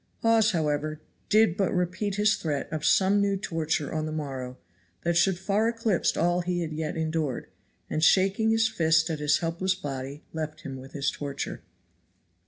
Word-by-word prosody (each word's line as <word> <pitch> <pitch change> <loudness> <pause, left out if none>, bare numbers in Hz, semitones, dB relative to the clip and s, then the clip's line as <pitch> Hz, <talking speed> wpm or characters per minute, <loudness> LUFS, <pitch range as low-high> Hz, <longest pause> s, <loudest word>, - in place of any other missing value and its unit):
Hawes 225 -1 +4
however 155 -4 -1 0.3
did 215 -4 +4
but 195 -2 +1
repeat 185 +3 -1
his 210 +1 +3
threat 145 -4 -3
of 155 -1 -3
some 195 +3 +4
new 200 -1 +1
torture 160 -5 -2
on 155 0 -1
the - - -4
morrow 135 -5 -5 0.5
that 170 0 +1
should 175 +1 +3
far 200 +4 +1
eclipse 225 -5 0
all 175 +2 +2
he 175 0 -1
had 160 -2 -3
yet 155 +1 -3
endured; 155 -5 -2 0.4
and 155 - -2
shaking 195 +5 +4
his 225 0 +3
fist 160 -5 +2
at 155 - -3
his 150 0 +3
helpless 175 +2 -1
body 140 -4 -6
left 155 -1 -5
him 135 -1 -6
with 130 +1 -11
his 140 -1 0
torture. 140 -1 -5
165 Hz, 175 wpm, -27 LUFS, 150-195 Hz, 0.5 s, Hawes